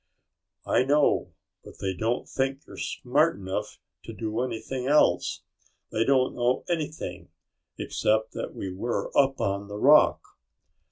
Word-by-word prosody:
"I - - +3
know, 145 +2 +2 0.3
but - - -13
they 95 -1 -1
don't 110 +6 -1
think 135 +1 -2
you're - - -12
smart 150 +6 +1
enough 100 +2 -5 0.3
to 115 - -7
do 110 +2 -3
anything 130 +1 -4
else. 150 +2 +3 0.5
They 110 - +1
don't 130 -2 +3
know 125 +1 0
anything 160 -3 -4 0.5
except 110 +1 0
that - - -6
we 95 - -5
were 115 +6 -3
up 135 -1 +3
on 100 +1 -1
the 105 0 -6
rock." 150 +7 +5
125 Hz, 135 wpm, -27 LUFS, 105-140 Hz, 0.5 s, rock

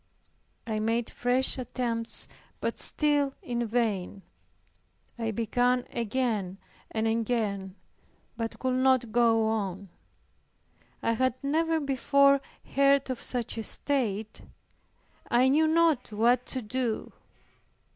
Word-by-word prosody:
I 220 -2 -2
made 225 +2 -1
fresh 255 +2 +2
attempts 235 -2 0 0.3
but - - -3
still 290 -2 +1
in 240 -1 -2
vain. 210 -4 -1 1.0
I 225 -1 -1
began 245 +3 +1
again 220 -5 -1 0.3
and 220 0 -2
again, 220 -4 -1 0.6
but 230 -1 -4
could 255 -1 -1
not 260 -3 +2
go 225 -1 +3
on. 200 -3 -3 1.1
I - - +2
had 255 +2 +1
never 320 +3 +1
before 280 0 +3 0.3
heard 275 -1 +3
of 255 - -5
such 245 -2 -2
a - - -3
state, 220 -6 0 0.9
I 250 +2 +4
knew 310 +3 +4
not 320 -7 +2
what 235 +4 +2
to 260 -2 -2
do. 235 +1 -3
240 Hz, 110 wpm, -28 LUFS, 220-265 Hz, 1.1 s, I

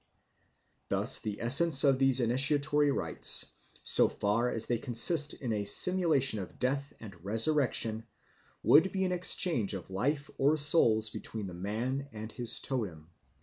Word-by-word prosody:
Thus - - +3
the 105 -1 -7
essence 135 +5 +5
of 135 -2 +1
these 135 -1 +2
initiatory 145 +4 +2
rites, 140 - +1 0.3
so - - +2
far 110 +4 -3
as 115 -2 -1
they 120 -2 -3
consist 145 +7 +3
in 120 -5 -6
a 105 -1 -4
simulation 140 - +1
of 95 - -11
death 140 +2 -4
and 95 -6 -14
resurrection, 115 0 -1 0.6
would 170 +6 +3
be 190 -1 -3
an 185 - -3
exchange 175 - +1
of 95 0 -11
life 140 +9 -4
or 145 +3 +1
souls 115 -8 +2
between 110 -2 -7
the 90 - -10
man 115 +10 -6
and 110 0 -10
his 120 -1 -3
totem. 90 - -7
125 Hz, 150 wpm, -28 LUFS, 110-145 Hz, 0.6 s, essence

